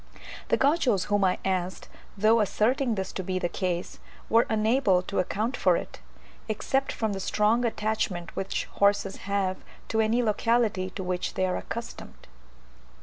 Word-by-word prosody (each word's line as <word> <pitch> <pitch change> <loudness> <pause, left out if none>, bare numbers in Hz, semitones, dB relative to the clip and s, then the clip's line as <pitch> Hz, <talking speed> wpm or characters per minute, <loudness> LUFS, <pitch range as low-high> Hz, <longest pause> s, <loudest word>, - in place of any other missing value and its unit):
The - - +2
Gauchos 270 - +2
whom 205 -1 +1
I 185 -1 +2
asked, 185 -1 -2 0.3
though 220 +3 +4
asserting 230 +4 +1
this 190 -1 -3
to 190 - -4
be 185 +1 -2
the 180 - 0
case, 180 -1 -3 0.3
were 230 +1 +4
unable 220 -3 +2
to 200 - -2
account 215 +7 -1
for 180 -7 +3
it, - - -7 0.5
except 270 +5 0
from 220 -2 -2
the 195 - -4
strong 210 +5 +2
attachment 215 -6 -2
which 195 0 -2
horses 200 -1 +2
have 195 -2 0 0.3
to 220 - +2
any 225 +3 +2
locality 220 -3 +1
to 190 - -4
which 180 0 -2
they 185 - +1
are 185 - -1
accustomed. 235 0 -7
205 Hz, 155 wpm, -27 LUFS, 185-225 Hz, 0.5 s, though